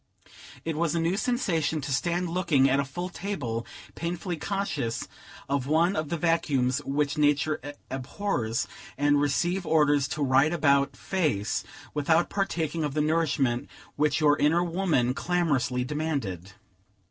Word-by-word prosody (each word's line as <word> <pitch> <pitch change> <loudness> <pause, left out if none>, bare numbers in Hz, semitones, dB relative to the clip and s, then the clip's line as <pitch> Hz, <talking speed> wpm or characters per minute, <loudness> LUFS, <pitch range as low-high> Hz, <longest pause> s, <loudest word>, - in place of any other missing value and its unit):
It 165 -1 -2
was 165 0 0
a - - +1
new 165 +3 +1
sensation 180 - 0
to 140 0 -3
stand 175 +5 0
looking 165 -6 +3
at 135 +1 +2
a - - +2
full 175 +7 -5
table, 155 - -4 0.3
painfully 175 +1 -3
conscious 160 - -2 0.4
of 140 -1 -1
one 165 +5 +3
of 155 -2 -2
the 170 - -1
vacuums 140 -6 +1
which 145 +1 -1
Nature 150 +1 +2 0.3
abhors, 130 - -2 0.3
and 145 +1 +3
receive 175 +7 +1
orders 150 -4 +3
to 150 +1 -2
right 135 +3 +4
about 140 -3 +2
face, 150 - -1 0.3
without 160 +3 +2
partaking 165 -5 -1
of 145 -1 -2
the 150 - +2
nourishment 150 -6 +1 0.3
which 150 +4 +2
your 150 -1 +5
inner 165 +4 +3
woman 165 -8 +1
clamorously 145 -7 0
demanded. 130 - -3
150 Hz, 140 wpm, -27 LUFS, 135-170 Hz, 0.4 s, your